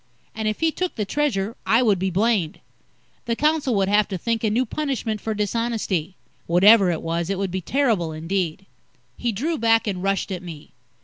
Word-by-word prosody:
And 220 0 -3
if 215 +5 -2
he 325 0 +3
took 365 +2 -3
the 210 - -2
Treasure, 230 -5 -1
I 230 +3 +3
would 205 -6 +3
be 190 +1 0
blamed. 195 -3 0 0.7
The 230 -1 -1
council 300 -3 +1
would 195 -1 +2
have 205 +1 +3
to 190 - -4
think 230 +5 -2
a 220 - +2
new 240 +5 +1
punishment 240 -6 -3
for 220 -1 -3
dishonesty. 210 -5 -2 0.3
Whatever 195 +3 +6
it 170 - -2
was, 165 +1 -2
it 195 - -1
would 195 -1 -2
be 190 +1 -3
terrible, 220 - 0
indeed. 170 +2 -3 0.5
He 240 - -1
drew 295 +9 -2
back 225 0 +3
and 190 -4 -3
rushed 195 +1 -1
at 180 -2 -4
me. 165 -4 -10
210 Hz, 195 wpm, -23 LUFS, 185-230 Hz, 0.7 s, Whatever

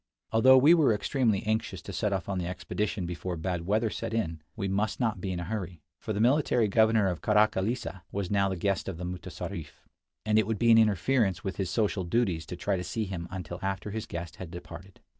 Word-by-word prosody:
Although 130 +4 +7
we 145 +6 +7
were 150 -10 +4
extremely 110 -2 +1
anxious 110 +1 -1
to - - -7
set 105 - 0
off 95 -3 -2
on 95 -2 -2
the 85 - -3
expedition 95 +1 -3
before 85 +1 -4
bad 85 0 -3
weather 110 +2 +1
set 115 -1 -4
in, 80 -8 -2
we 100 -4 -2
must 100 +3 -1
not 110 -7 0
be 95 - -2
in 90 - -3
a - - -3
hurry, 90 -5 -5 0.2
for - - -5
the 105 - -1
military 125 -1 +3
governor 110 0 +4
of 90 -3 -1
Karakillissa 105 -1 +1
was 100 -2 -3
now 100 -1 +2
the 95 - -2
guest 100 +2 -1
of 90 - -5
the 90 - -5
mutessarif, 90 -3 -6 0.5
and 110 0 +4
it 110 - +1
would 110 -1 -1
be 115 +3 +4
an 115 - +8
interference 105 -3 +2
with 95 - -4
his 95 -3 -1
social 105 -2 0
duties 85 -5 0
to 90 - -5
try 95 +2 -1
to 90 - -3
see 110 +3 -2
him 90 -3 -5
until 90 -2 -6
after 95 +1 -3
his 110 +1 -4
guest 85 -1 -6
had 95 - -7
departed. 90 +1 -10
100 Hz, 225 wpm, -29 LUFS, 90-110 Hz, 0.5 s, an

